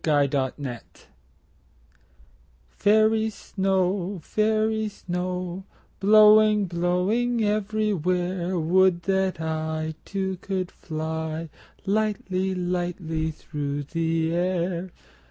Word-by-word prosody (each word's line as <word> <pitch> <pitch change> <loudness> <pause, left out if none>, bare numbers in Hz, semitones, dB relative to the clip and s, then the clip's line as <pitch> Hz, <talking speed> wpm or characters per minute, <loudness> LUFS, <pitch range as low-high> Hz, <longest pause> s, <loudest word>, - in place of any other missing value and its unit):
Snow 140 -3 +2
Song 130 -5 -5 1.9
FAIRY 220 +1 +3
snow, 190 -2 -1
fairy 220 0 +1
snow, 180 -1 -4 0.4
Blowing, 215 0 +6
blowing 185 +7 0
everywhere, 190 -4 0
Would 175 +1 +3
that 190 -2 0
I 160 0 -2
Too, 190 -1 -3
could 185 -1 -3
fly 160 0 -4 0.4
Lightly, 195 -2 0
lightly 175 -3 -2
through 145 -2 -4
the 165 +1 -1
air. 180 0 -1
180 Hz, 80 wpm, -25 LUFS, 165-205 Hz, 1.9 s, Blowing